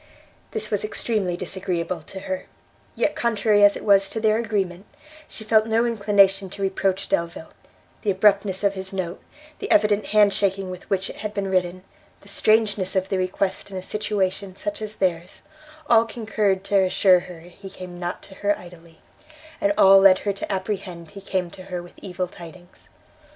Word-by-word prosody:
This 215 -1 -4
was 205 - 0
extremely 210 -4 -1
disagreeable 180 -2 -3
to 190 +5 -9
her; 185 -1 -5 0.5
yet, - - 0
contrary 215 -3 +2
as 205 0 +6
it - - -10
was 195 -1 +4
to 225 - -4
their 220 0 +2
agreement, 200 -4 -2 0.4
she 220 - -8
felt 220 0 +3
no 225 +1 +2
inclination 200 -4 +3
to 200 - -9
reproach 195 0 0
Delvile; 170 -1 -2 0.5
the 210 - -1
abruptness 200 0 +2
of 200 -1 +3
his 190 0 -6
note, 185 -2 -4 0.4
the - - -5
evident 210 0 +3
hand 210 -1 +4
shaking 195 -1 0
with 180 - -10
which 190 -1 -1
it - - -13
had 210 0 -5
been 200 -1 -1
written, 185 0 0 0.4
the - - -18
strangeness 205 -2 +1
of 190 0 0
the 190 - 0
request 185 +2 -2
in 190 - -6
a 185 - -5
situation 195 -2 -2
such 205 +2 -4
as 215 0 -5
theirs, 175 -3 -2 0.4
all 230 -1 +5
concurred 210 -4 -1
to 200 0 +2
assure 185 0 +4
her 175 -2 -11
he 180 +3 -12
came 180 -1 -10
not 175 0 -4
to - - -12
her 205 +1 0
idly, 170 -2 -15 0.6
and 300 0 +3
all 195 0 +8
led 195 -1 +7
her 200 - +1
to 200 - -5
apprehend 185 -4 -4
he 200 -1 -10
came 185 -3 -2
to 185 - -12
her 180 -2 -5
with 175 - -14
evil 180 -1 -4
tidings. 175 +1 -14
195 Hz, 180 wpm, -23 LUFS, 185-205 Hz, 0.6 s, all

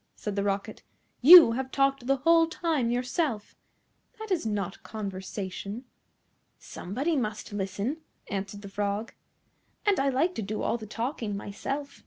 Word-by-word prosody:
said 210 -2 -5
the 200 - 0
Rocket. 200 0 -2 0.4
"You 320 -1 +11
have 260 +3 -3
talked 275 -2 +1
the 275 - +4
whole 330 +4 +4
time 320 -7 -1
yourself. 250 - -2 0.6
That 440 -1 -8
is 330 -11 0
not 200 -3 -3
conversation." 200 +2 -6 0.7
"Somebody 275 - -3
must 215 -5 -3
listen," 205 +7 -2 0.3
answered 200 +1 -5
the - - -7
Frog, 205 +2 -3 0.7
"and 410 -2 +3
I 275 0 +2
like 295 +8 +1
to - - -4
do 210 +1 -4
all 235 - 0
the 215 - -9
talking 230 -2 -3
myself. 275 +8 -5
230 Hz, 145 wpm, -28 LUFS, 205-275 Hz, 0.7 s, You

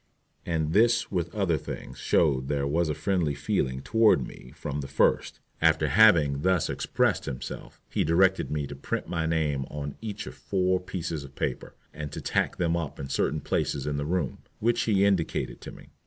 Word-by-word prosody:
And 80 -2 0
this 120 +3 +3
with 85 -3 -1
other 90 -7 +1
things - - -8
shows 70 -6 +2
there 70 -1 0
was 80 +3 +1
a 75 - -1
friendly 90 -8 0
feeling 65 -1 -1
toward 115 -1 +4
me 60 - -12
from 75 0 -4
the 70 - -6
first. 70 - +1 0.2
After 80 -2 +3
having 75 -6 +5
thus 90 0 +2
expressed - - 0
himself, 65 -3 -7
he - - 0
directed 95 +3 +3
me 75 -1 -1
to 70 - -8
print 70 - -3
my 80 -2 -1
name 75 -4 0
on 70 0 -5
each 110 -2 -5
of - - -8
four 95 -1 0
pieces 85 -4 -4
of 70 0 -13
paper, - - -3 0.2
and 75 0 -6
to - - -4
tack - - 0
them 85 -1 +1
up 85 -4 -4
in 70 - -5
certain 75 +2 0
places 70 0 -1
in 75 -1 -1
the 70 - -2
room, 85 -6 -1 0.2
which 120 +2 +2
he 100 -3 +3
indicated 95 -5 0
to - - -8
me. - - -14
80 Hz, 190 wpm, -27 LUFS, 70-95 Hz, 0.2 s, having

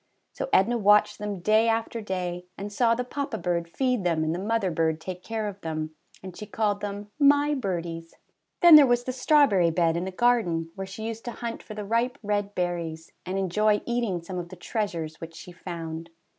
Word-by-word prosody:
So - - -4
Edna 235 +5 +3
watched 210 0 +4
them 205 -3 -4
day 215 +4 +4
after 225 0 -1
day, 180 -3 -4
and 205 +1 -6
saw 230 +1 +3
the 250 - -2
papa 275 -1 -4
bird 170 -2 -2
feed 250 +2 0
them 165 -3 +1
and 155 +1 0
the 175 - -3
mother 205 -1 0
bird 160 -1 0
take 180 +1 -7
care 220 -1 -3
of 200 -1 -7
them, 155 -1 -4 0.3
and 185 -2 -8
she 210 - -8
called 205 -2 -1
them 205 0 -5
^^my 290 +1 +5
birdies." 165 -4 -4 0.5
Then 345 -3 +10
there 290 -2 +7
was 245 0 +2
the 255 - -3
strawberry 250 - +4
bed 165 0 +2
in 175 +2 -2
the 190 - -4
garden, 185 -8 +1
where 195 +1 -6
she 200 +3 -8
used 225 0 -6
to 240 - -3
hunt 235 -1 -5
for 215 - -10
the 210 -1 -5
ripe 235 +5 0
red 205 0 -1
berries, 170 -2 -3 0.2
and 185 +1 -2
enjoy 210 +3 +2
eating 235 -8 -1
some 180 +1 -5
of 175 -1 -6
the 185 - -9
treasures 170 -5 -4
which 165 0 -8
she 180 - -10
found. 165 -2 -7
200 Hz, 210 wpm, -26 LUFS, 170-225 Hz, 0.5 s, Then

